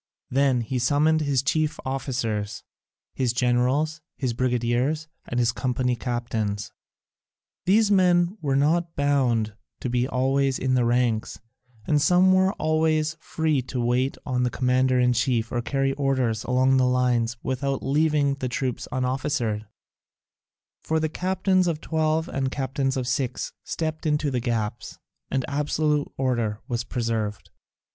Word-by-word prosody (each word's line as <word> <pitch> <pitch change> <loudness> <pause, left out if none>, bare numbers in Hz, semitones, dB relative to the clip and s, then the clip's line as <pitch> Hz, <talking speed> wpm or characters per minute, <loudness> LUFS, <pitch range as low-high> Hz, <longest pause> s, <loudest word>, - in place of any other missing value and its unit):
Then 135 -1 +3
he 125 +3 -2
summoned 150 +5 +3
his 140 -4 +1
chief 155 +2 0
officers, 115 -6 -3 0.5
his 125 -3 0
generals, 130 +6 +1 0.2
his 130 -4 -1
brigadiers, 125 +5 0 0.2
and 120 - -2
his 120 -1 +3
company 125 0 -1
captains. 115 -4 -3 1.0
These 210 +2 +4
men 180 -1 +3
were 140 -3 0
not 165 +4 +1
bound 125 -7 +1 0.3
to 125 - -3
be 125 +1 +1
always 135 +1 +1
in 130 0 0
the 125 -2 +3
ranks, 120 -2 0 0.5
and 150 +3 +2
some 180 +4 +5
were 190 +1 +3
always 155 -2 +1
free 160 -4 0
to 125 0 -5
wait 125 +3 +1
on 125 -2 0
the 125 - +2
commander 125 +1 +2
in 125 0 +3
chief 115 -1 0
or 120 - -1
carry 135 +2 0
orders 130 -6 0
along 130 +1 +3
the 130 -1 +3
lines 125 -2 +1
without 135 +1 -2
leaving 145 0 +2
the 130 -2 -4
troops 125 0 -3
unofficered: 130 -4 -1 1.1
for 160 0 0
the 155 0 0
captains 185 +1 +1
of 165 -3 -1
twelve 160 0 0
and 135 -1 -2
the - - 0
captains 135 0 -1
of 125 -1 -2
six 130 -1 -2
stepped 155 -1 -3
into 150 -1 +1
the 125 - 0
gaps, 115 -2 -3 0.3
and 135 -1 -1
absolute 150 +1 0
order 120 -5 0
was 120 -1 -2
preserved. 115 -4 -3
130 Hz, 145 wpm, -25 LUFS, 120-150 Hz, 1.1 s, some